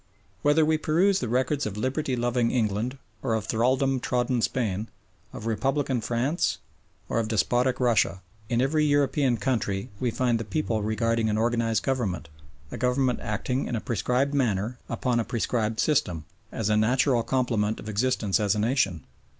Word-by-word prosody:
Whether 150 +2 +4
we 155 0 +2
peruse 180 +6 +2
the 120 - -3
records 130 +2 0
of 105 -1 -6
liberty 130 +4 -1
loving 120 0 +1
England 115 +2 -1 0.2
or 115 -4 0
of 110 -1 -2
thraldom 130 +4 +1
trodden 125 -1 0
Spain, 110 -3 -1 0.4
of 110 - -8
republican 130 +2 0
France, 120 +9 0 0.5
or - - 0
of 115 - -1
despotic 120 +4 +1
Russia, 115 -6 +2 0.3
in 120 0 +1
every 150 +3 +2
European 140 -3 +2
country 105 -4 -1
we 125 - 0
find 120 0 +1
the - - -3
people 110 0 -1
regarding 115 +1 0
an 105 - 0
organised 115 -1 +1
government, 115 - -2 0.4
a - - -5
government 125 0 +1
acting 120 +5 -2
in 120 - -2
a - - -1
prescribed 125 +5 0
manner 120 -3 0
upon 125 -2 0
a - - +1
prescribed 110 -1 -1
system, 90 - +1 0.3
as 110 - -2
a 105 - +3
natural 125 +3 +3
complement 115 -4 0
of - - -9
existence 110 -2 +1
as 105 -2 +2
a - - -1
nation. 105 - 0
120 Hz, 165 wpm, -26 LUFS, 110-130 Hz, 0.5 s, Whether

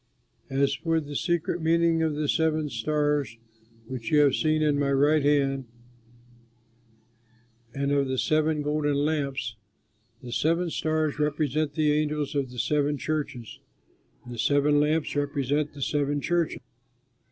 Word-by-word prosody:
As 140 +1 +1
for 165 +3 0
the 145 -2 -7
secret 170 0 -1
meaning 165 0 +2
of 160 -2 0
the 150 0 -1
seven 155 -1 +1
stars 145 -1 -1 0.5
which 125 -4 -6
you 150 -1 +5
have 140 -3 +4
seen 155 0 +1
in 145 -2 +2
my 140 -1 +1
right 145 +2 +3
hand 135 -2 +1 2.1
and 140 0 -1
of 140 -1 +2
the 130 0 -2
seven 155 +1 +1
golden 150 0 0
lamps 140 -6 -1 0.7
the 120 - -8
seven 165 +6 +1
stars 155 -2 -1
represent 150 0 0
the 155 -1 +2
angels 150 -1 -1
of 140 -3 -1
the 125 - -11
seven 145 +2 +1
churches, 145 -6 -4 0.7
and 120 - -8
the 120 - -8
seven 145 +4 +3
lamps 150 +1 0
represent 145 0 -1
the 140 - -4
seven 145 0 0
churches." 170 +2 -1
145 Hz, 140 wpm, -26 LUFS, 140-155 Hz, 2.1 s, you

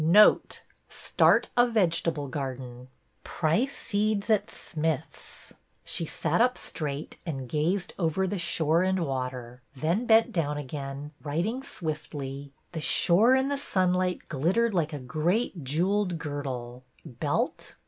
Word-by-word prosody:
'' - - 0 0.2
Note - - +3
— - - -41
Start - - +3
a 245 0 +5
vegetable 165 -9 +1
garden. 130 -2 -6 0.4
Price 215 - 0
seeds 210 0 0
at 215 - +2
Smith's." 160 -3 -5 0.3
She 165 - -1
sat 165 +5 0
up 250 +1 +3
straight 150 -1 -5
and 135 -7 -5
gazed 175 +7 -1
over 170 +2 +1
the 190 +1 -2
shore 170 -1 +2
and 185 -2 +1
water, 125 -2 -4
then 170 - 0
bent 225 0 +5
down 150 -4 -1
again, 140 0 -6
writing 175 - -2
swiftly, 145 - -5
— - - -43
The 160 - -4
shore 210 +11 +5
in 265 +1 +1
the 285 -1 -1
sunlight 185 -6 0
glittered 190 - +1
like 165 -3 +1
a 150 - -4
great 160 - -1
jewelled 180 +6 0
girdle 130 -5 -5 0.2
(belt?) 120 - -2
160 Hz, 140 wpm, -28 LUFS, 140-195 Hz, 0.4 s, a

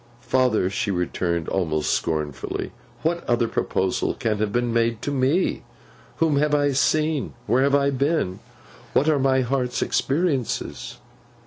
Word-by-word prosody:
'Father,' 125 -7 +2
she 100 - -2
returned, 85 -2 -1
almost 80 -5 0
scornfully, 75 -3 -2 0.3
'what 170 +1 0
other 120 -1 +2
proposal 95 -4 -1
can 110 -5 -1
have 105 -1 0
been 120 0 0
made 115 -1 +1
to 145 - -1
me? 140 +6 +1 0.5
Whom 160 -4 +2
have 150 +1 +2
I 145 -1 +2
seen? 155 +2 +1
Where 125 +2 +2
have 140 +1 +3
I 140 0 +3
been? 135 - 0 0.5
What 145 - +3
are 155 -3 +3
my 130 0 +3
heart's 125 0 -1
experiences? 140 - -1
130 Hz, 140 wpm, -23 LUFS, 105-145 Hz, 0.5 s, have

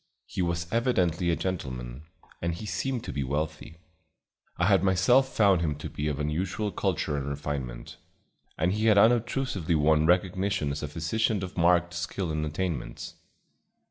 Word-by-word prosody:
He - - -4
was 85 -1 -1
evidently 95 -8 +1
a 85 - +3
gentleman, 65 -7 -5 0.3
and 85 0 -1
he 100 - -7
seemed 130 +3 -2
to - - -5
be 70 - -1
wealthy. 75 +4 -3 0.8
I 90 - +2
had 100 -1 +4
myself 120 +9 +4
found 100 -7 +4
him 75 -3 0
to 75 - -7
be 75 - -3
of 75 -2 -2
unusual 90 +8 -2
culture 90 -7 -1
and 70 0 -3
refinement, 70 -4 -5 0.6
and 90 +3 +1
he 110 +2 +1
had 105 -2 +5
unobtrusively 110 - +2
won 80 +1 +3
recognition 95 -2 +1
as 70 - -4
a 75 - -3
physician 95 +7 -1
of 90 - -6
marked 85 0 +3
skill 90 0 -3
and 75 0 -1
attainments. 75 +1 -4
85 Hz, 160 wpm, -28 LUFS, 75-100 Hz, 0.8 s, had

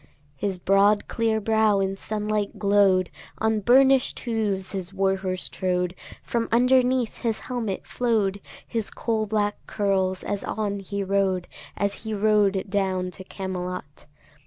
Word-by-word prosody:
His 195 +4 -2
broad 200 +3 +3
clear 225 -1 0
brow 220 -1 +3
in 195 0 0
sunlight 210 0 -2
glow'd; 200 -3 +3 0.3
On 220 0 +1
burnish'd 265 +4 +4
hooves 210 -5 -1
his 190 -2 -4
war 195 0 +1
horse 185 -1 -3
trode; 180 -1 -1 0.3
From 230 -1 -2
underneath 250 0 +3
his 230 -3 -1
helmet 230 -6 -3
flow'd 210 -5 0 0.2
His 225 -3 -3
coal 220 -2 -1
black 205 -1 0
curls 190 -2 0
as 205 -1 -3
on 205 -2 -2
he 200 +1 -4
rode, 190 -2 0 0.3
As 200 0 -1
he 220 -1 -4
rode 205 -2 +2
down 190 -2 -1
to 190 - -8
Camelot. 180 -6 -6
200 Hz, 135 wpm, -25 LUFS, 190-220 Hz, 0.3 s, burnish'd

